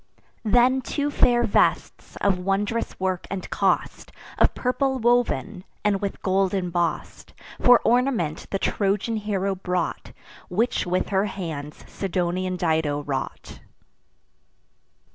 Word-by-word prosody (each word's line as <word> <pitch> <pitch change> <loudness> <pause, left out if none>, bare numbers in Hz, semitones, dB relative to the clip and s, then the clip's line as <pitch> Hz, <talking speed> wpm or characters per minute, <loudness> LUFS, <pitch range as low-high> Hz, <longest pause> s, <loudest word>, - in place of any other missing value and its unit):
Then 245 +4 +4
two 285 +3 -2
fair 240 -3 +3
vests, 210 - 0
of 195 -2 +1
wondrous 200 +5 -1
work 185 -1 -2
and 195 -2 -4
cost, - - 0 0.3
Of - - +4
purple 265 +1 0
woven, 240 -5 +1 0.2
and 200 -2 +2
with 200 -1 -4
gold 190 0 +1
emboss'd, 175 -3 -2 0.3
For 245 -1 +7
ornament 240 - +1
the 195 - -1
Trojan 205 +3 0
hero 200 -2 -1
brought, 180 -2 -3 0.4
Which 215 +1 0
with 180 +1 0
her 195 0 +2
hands 160 -7 -6
Sidonian 185 -1 -2
Dido 160 -4 0
wrought. 135 -2 -5
195 Hz, 115 wpm, -24 LUFS, 180-230 Hz, 0.4 s, For